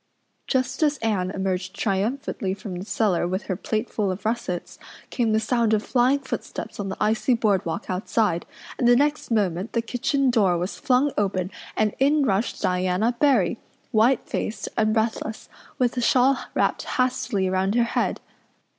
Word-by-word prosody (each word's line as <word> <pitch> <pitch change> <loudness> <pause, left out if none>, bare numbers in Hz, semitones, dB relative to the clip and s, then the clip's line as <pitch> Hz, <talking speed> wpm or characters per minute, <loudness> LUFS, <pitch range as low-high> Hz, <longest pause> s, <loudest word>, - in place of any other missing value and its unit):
Just 260 +1 0
as 295 -1 +3
Anne 205 -6 0
emerged 185 -1 -2
triumphantly 200 -1 -1
from 200 -2 -7
the 185 - -6
cellar 195 -6 +1
with 185 +3 -2
her 185 - -3
plateful 215 +1 -2
of 185 +3 -5
russets 215 -6 -3 0.3
came 235 -3 +1
the 215 - +3
sound 225 0 +2
of 210 - -1
flying 255 +2 +3
footsteps 260 - -6
on 200 -1 -3
the 190 - -5
icy 220 +4 +2
board 205 -5 +2
walk 180 +7 -4
outside 185 -1 0 0.3
and 240 - +3
the 245 - +7
next 290 +3 +1
moment 195 -4 0
the 230 - +1
kitchen 260 +3 +1
door 195 -7 +3
was 180 +3 -3
flung 280 0 +2
open 190 -2 -1 0.3
and 215 -1 +2
in 285 +2 +4
rushed 205 0 -1
Diana 185 +6 +1
Barry, 240 - +3 0.3
white 230 +3 +3
faced 220 - -3
and 215 -1 +2
breathless, 220 0 -2 0.3
with 250 -1 +1
a 245 - -1
shawl 255 +2 +3
wrapped - - +1 0.2
hastily 250 -6 +1
around 190 +2 0
her 240 - +4
head. 235 - -1
220 Hz, 165 wpm, -24 LUFS, 190-245 Hz, 0.3 s, the